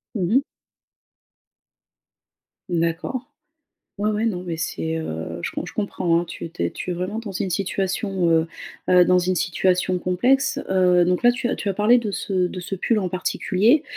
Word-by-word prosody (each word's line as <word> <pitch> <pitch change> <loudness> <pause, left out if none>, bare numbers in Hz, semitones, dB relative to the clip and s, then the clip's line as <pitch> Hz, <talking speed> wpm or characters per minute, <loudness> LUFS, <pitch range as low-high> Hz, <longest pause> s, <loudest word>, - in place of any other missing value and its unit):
Mmh 190 -1 0
mh. 270 - +6 2.3
D'accord. 170 +9 -1 0.7
Ouais, 210 +1 +1
ouais, 215 +2 0
non 185 -6 -1
mais 175 -2 -3
c'est, 160 0 -3
heu, 85 - -5
je - - -3
com - - -4
comprends, 175 -5 +1
hein, - - -5
tu 170 - -7
es - - -7
tu 160 - -4
es 85 - +1
tu 180 - -5
es - - 0
vraiment 185 +5 -3
dans 215 -4 -7
une 190 - -2
situation, 190 0 -1
heu, 165 0 +3 0.4
heu, 180 -1 +7
dans 180 +1 +4
une 180 +1 0
situation 180 +1 +1
complexe, 255 +10 +2
heu, 180 -2 +4
donc 180 +1 +1
là 240 0 +5
tu 245 0 -2
as - - 0
tu - - -5
as 200 - +1
parlé 215 +5 +4
de 230 -3 -1
ce 195 +1 -4
de 180 - -6
ce 195 - -4
pull 220 +4 +1
en 185 -3 -2
particulier. 200 - +2
185 Hz, 190 wpm, -23 LUFS, 175-210 Hz, 2.3 s, heu